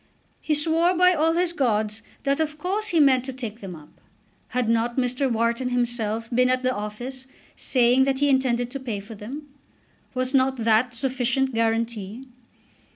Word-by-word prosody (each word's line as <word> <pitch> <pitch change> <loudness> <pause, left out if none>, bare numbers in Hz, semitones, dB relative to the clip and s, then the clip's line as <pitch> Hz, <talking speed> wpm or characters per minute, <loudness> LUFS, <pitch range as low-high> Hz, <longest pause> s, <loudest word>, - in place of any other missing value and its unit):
He 305 - +1
swore 330 +4 +2
by 365 +1 +5
all 325 0 +2
his 345 0 +1
gods 220 -6 0 0.2
that 275 +1 +1
of 305 -1 -1
course 390 +7 -1
he 345 -6 +2
meant 265 -4 +5
to 265 - -4
take 230 -4 -6
them 190 -3 -7
up. 150 -2 -17 0.5
Had 250 -2 -1
not 230 +2 0
Mr. 255 +1 0
Wharton 235 +2 0
himself 235 -2 -1
been 250 +1 +3
at 255 0 +1
the 255 0 +1
office 245 +5 -5 0.3
saying 250 +1 +3
that 270 -1 0
he 285 +1 +2
intended 250 -3 +1
to 275 - -4
pay 235 -6 -4
for 205 +3 -10
them? 255 +8 -8 0.7
Was 255 +1 -1
not 265 0 +2
that 230 +2 +2
sufficient 265 +1 0
guarantee? 225 0 -2
250 Hz, 170 wpm, -24 LUFS, 230-275 Hz, 0.7 s, by